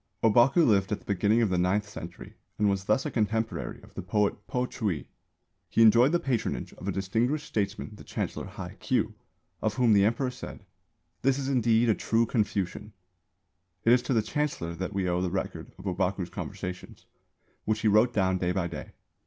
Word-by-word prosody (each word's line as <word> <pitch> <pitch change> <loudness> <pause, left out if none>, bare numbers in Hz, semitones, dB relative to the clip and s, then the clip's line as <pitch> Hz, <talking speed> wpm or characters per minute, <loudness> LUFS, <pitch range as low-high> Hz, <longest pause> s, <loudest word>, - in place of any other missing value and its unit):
Ōbaku 120 +9 +5
lived 100 -3 +3
at 105 - +1
the - - -22
beginning 105 +4 +2
of 110 - +2
the 90 - +2
ninth 100 +4 +1
century, 85 -4 -9 0.2
and 105 - +2
was 100 -1 0
thus 110 +8 +2
a 150 - -2
contemporary 110 0 -1
of - - -16
the - - -5
poet 105 +1 0
Po 125 0 0
Chü 105 - -2
i. - - -15 0.6
He 115 - +4
enjoyed 115 +5 +6
the 175 - +2
patronage 125 -7 -2
of - - -9
a - - +1
distinguished 115 +10 0
statesman 105 0 -2
the - - -12
Chancellor - - -4
Hai - - -8
Kyū, - - 0 0.5
of 110 -1 0
whom 120 -2 +4
the 100 -1 +5
Emperor 115 +5 +1
said, - - -9 0.6
"This 135 0 +2
is 140 -1 -2
indeed 120 -3 +3
a 110 - +5
true 115 +2 +1
Confucian." 105 -2 -2 0.9
It 115 - +7
is 125 - +4
to 130 - -1
the 110 - +3
Chancellor 110 - -2
that 90 +3 -4
we 95 -2 -1
owe 90 0 +1
the 90 - 0
record 95 +1 -4
of - - -12
Ōbaku's - - -1
conversations, 90 0 -7 0.6
which 110 0 0
he 110 - +2
wrote 110 +4 +5
down 95 -4 +1
day 90 0 0
by 95 -2 0
day. 85 - -7
105 Hz, 195 wpm, -28 LUFS, 95-120 Hz, 0.9 s, It